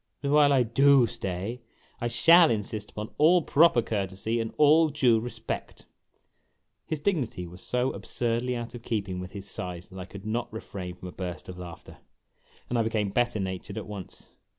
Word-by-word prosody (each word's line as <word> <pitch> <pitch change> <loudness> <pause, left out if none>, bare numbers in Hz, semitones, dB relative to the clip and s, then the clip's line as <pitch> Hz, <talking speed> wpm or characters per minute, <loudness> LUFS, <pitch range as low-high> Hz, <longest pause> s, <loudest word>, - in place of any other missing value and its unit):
But 140 - 0
while 145 -1 +6
I 135 -3 +4
do 135 +2 +5
stay 100 +3 -4 0.4
I 120 - -1
shall 165 +7 +6
insist 105 -1 -2
upon 105 0 -7
all 170 +3 +5
proper 150 -6 +4
courtesy 100 +2 -2
and 115 -1 -2
all 155 +1 +5
clue 125 -6 +3
respect! 120 +2 -6 0.5
' - - -48
His 155 - -2
dignity 135 - -1
was 90 +1 -11
so 125 +1 0
absurdly 120 +1 -2
out 120 0 -5
of 120 - -8
keeping 100 -6 -3
with 90 +1 -8
his 100 -1 -7
size 90 -2 -6
that 95 - -10
I 90 - -6
could 100 +1 -11
not 120 +2 -2
refrain 95 -5 -7
from 90 0 -9
a - - -9
burst 90 -1 -6
of 90 -1 -8
laughter, 85 -2 -10 0.7
and 120 - 0
I - - +4
became 110 -2 0
better 120 -1 +1
natured 95 +2 -4
at 110 - -4
once. 100 -3 -9
115 Hz, 185 wpm, -27 LUFS, 95-125 Hz, 0.7 s, while